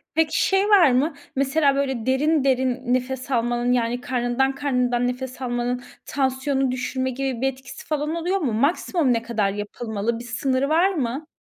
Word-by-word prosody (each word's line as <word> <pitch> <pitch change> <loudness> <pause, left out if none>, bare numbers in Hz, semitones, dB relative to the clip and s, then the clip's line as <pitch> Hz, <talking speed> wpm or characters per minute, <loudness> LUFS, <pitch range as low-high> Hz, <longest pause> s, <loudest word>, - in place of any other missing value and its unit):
Peki 320 -1 +2
şey 390 +2 +2
var 375 -9 +6
mı? 275 +6 +2 0.2
Mesela 275 +1 +2
böyle 265 -5 -1
derin 285 +3 +2
derin 260 -1 +1
nefes 255 +1 -2
almanın, 240 0 +1
yani, 245 0 0
karnından 250 +2 0
karnından 250 -3 0
nefes 255 +1 -5
almanın 245 0 -2 0.2
tansiyonu 270 0 0
düşürme 260 +1 -2
gibi 260 -2 -3
bir 265 - +2
etkisi 265 0 -12
falan 305 +1 -1
oluyor 350 +3 0
mu? 270 - -1
Maksimum 285 - +1
ne 230 - 0
kadar 225 -4 0
yapılmalı? 215 +2 -3
Bir - - -8
sınırı 260 +3 0
var 350 +5 +3
mı? 275 -1 -3
260 Hz, 165 wpm, -23 LUFS, 245-280 Hz, 0.2 s, var